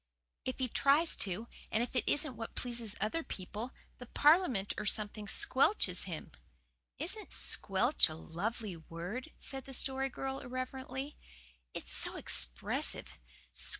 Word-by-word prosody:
"If 255 - -2
he 260 - 0
tries 285 +7 +4
to, 200 +4 -1 0.2
and 220 +2 +2
if 245 - -6
it 250 - +2
isn't 290 -3 +1
what 225 +1 -6
pleases 235 -4 -3
other 215 +11 0
people, 210 - -6 0.3
the 250 - -9
Parliament 290 - +4
or - - -3
something 210 -1 -1
squelches 205 - +4
him." 170 -5 -6 0.7
"Isn't - - -2
'squelch' 65 -1 +4
a - - -6
lovely 195 - -3
word?" 175 - -6
said 270 -2 -3
the 270 - -7
Story 270 +1 +1
Girl 270 +1 -3
irrelevantly. 260 +2 -5 0.6
"It's - - -5
so - - +1
expressive. - - -2
240 Hz, 135 wpm, -34 LUFS, 195-265 Hz, 0.7 s, tries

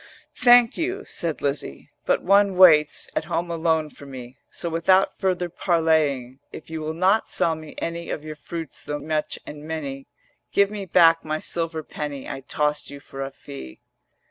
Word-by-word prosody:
'Thank 245 -2 +6
you,' 370 +5 -2
said 165 -3 -4
Lizzie: 140 - -3 0.2
'But - - +2
one 200 0 +4
waits 155 -5 +6
At - - -1
home 170 0 -2
alone 160 -2 0
for 140 - -13
me: 130 -1 -10
So - - -5
without 170 +4 +2
further 180 -2 0
parleying, 160 -7 +1
If 160 - -10
you 160 -1 -4
will 155 +1 -3
not 190 +6 +2
sell 165 - +1
me 155 -1 -9
any 170 0 -4
Of 155 - -4
your 155 0 -6
fruits 165 +2 -8
though 150 - -3
much 155 0 -2
and 150 0 -9
many, 145 -4 -5 0.5
Give 200 0 +4
me 205 -2 -5
back 165 -1 +5
my 155 0 -2
silver 165 0 -3
penny 145 -2 -6
I - - -5
tossed 150 +2 -1
you 140 - -9
for 135 0 -9
a 135 - -3
fee.' 65 - -10
160 Hz, 175 wpm, -24 LUFS, 145-175 Hz, 0.5 s, Thank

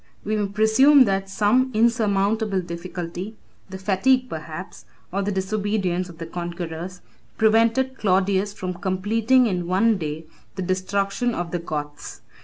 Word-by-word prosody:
We 215 - -1
may 205 -1 0
presume 220 +8 +5
that 195 -1 -1
some 220 +6 +2
insurmountable 215 -2 +2
difficulty, 175 +3 -6 0.3
the 190 - -6
fatigue, 250 +7 +2
perhaps, - - -7 0.3
or 195 +2 -1
the 200 +1 -1
disobedience, 190 -2 -1
of 170 - -12
the 165 - -6
conquerors, 170 +1 -6 0.4
prevented 230 +4 +2
Claudius 195 0 +2
from 185 -3 -5
completing 210 +8 +2
in 180 -5 -1
one 195 +3 +2
day 155 0 -4 0.3
the 190 - -3
destruction 195 +5 -1
of 175 -1 -4
the 175 - -1
Goths. 150 -3 -6
195 Hz, 135 wpm, -23 LUFS, 180-220 Hz, 0.4 s, presume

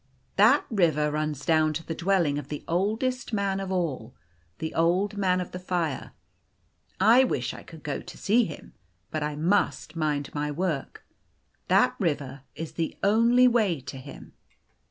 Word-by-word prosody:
" - - -41
That - - +5
river 155 -7 +2
runs 150 -1 -2
down 155 -1 +3
to 165 +2 -5
the 165 - -3
dwelling 170 -4 +1
of 140 - -8
the 150 - -6
oldest 220 +9 -1
man 200 -2 0
of 195 -1 -4
all 155 - -2 0.4
the 160 - -4
Old 180 +5 +1
Man 185 -2 +1
of 180 - -5
the 180 - -6
Fire. 175 -5 -2 0.9
I 230 +7 +6
wish 125 - -1
I - - -9
could 160 -3 -13
go 145 -2 -3
to - - -11
see 230 +3 +3
him. 155 - -9 0.4
But 155 - -2
I 150 0 -2
must 170 0 0
mind 150 -3 -1
my 150 0 -2
work. 155 -2 -3 0.6
That 125 0 +4
river 140 -5 -2
is 160 0 -6
the 165 -1 -3
only 235 +5 +5
way 215 - +2
to 130 +1 -8
him." 135 +2 -11
165 Hz, 170 wpm, -27 LUFS, 150-195 Hz, 0.9 s, I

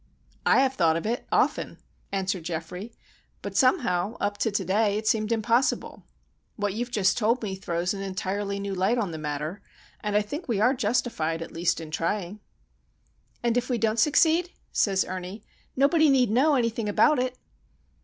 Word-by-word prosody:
"I - - +6
have 265 -1 +2
thought 165 -8 +2
of 165 - -5
it, 235 +3 -2
often," - - +1 0.3
answered 190 -2 -2
Geoffrey; 175 +6 -5 0.5
"but - - -6
somehow, 215 -5 +2
up 205 0 -2
to - - +1
to 200 -2 -2
day, 205 +2 +2
it 215 0 -4
seemed 215 0 +1
impossible. 230 +3 +1 0.5
What 205 -2 -1
you've 240 +3 -3
just 205 -4 +1
told 235 +2 +1
me 200 -3 -3
throws 175 -1 -2
an 195 - -5
entirely 195 +1 -3
new 200 0 -3
light 190 +6 +1
on 205 -7 -1
the 160 - -6
matter, 150 +5 -4 0.4
and 210 -1 -1
I 210 - +2
think 295 - -6
we 225 -5 0
are 245 +5 +4
justified 210 - -1
at - - -11
least 170 0 0
in 160 -2 -8
trying." 180 +4 -2 1.0
"And 235 0 +2
if 245 +1 -1
we 245 - +1
don't 225 0 0
succeed," 320 +6 +3 0.2
says 195 -2 +2
Ernie, 185 +3 -6 0.3
"nobody 300 +3 +4
need 255 -5 +3
know 280 +6 +4
anything 230 -3 0
about 300 +7 +4
it." 255 0 -2
210 Hz, 175 wpm, -26 LUFS, 185-240 Hz, 1.0 s, I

